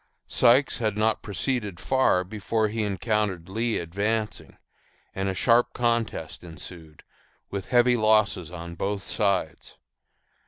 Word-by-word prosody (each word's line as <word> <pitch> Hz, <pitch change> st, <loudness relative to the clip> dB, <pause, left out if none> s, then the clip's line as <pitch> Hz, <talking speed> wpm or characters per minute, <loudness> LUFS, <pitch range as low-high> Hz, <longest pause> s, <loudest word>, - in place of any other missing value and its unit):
Sykes 125 Hz, +4 st, +4 dB
had 110 Hz, -3 st, -1 dB
not 110 Hz, 0 st, +1 dB
proceeded 105 Hz, -2 st, -3 dB
far 130 Hz, -9 st, +2 dB
before 110 Hz, +3 st, -1 dB
he 110 Hz, +1 st, -2 dB
encountered 105 Hz, -3 st, -1 dB
Lee 115 Hz, +4 st, -1 dB
advancing, 105 Hz, +6 st, -3 dB, 0.6 s
and 95 Hz, 0 st, -2 dB
a 95 Hz, -, -2 dB
sharp 120 Hz, +4 st, +3 dB
contest 115 Hz, -10 st, -1 dB
ensued, 80 Hz, -2 st, -10 dB, 0.5 s
with 100 Hz, -2 st, -4 dB
heavy 125 Hz, 0 st, +4 dB
losses 110 Hz, -6 st, +2 dB
on 85 Hz, -1 st, -8 dB
both 100 Hz, +3 st, -3 dB
sides. 100 Hz, -8 st, -1 dB
105 Hz, 120 wpm, -26 LUFS, 90-115 Hz, 0.6 s, Sykes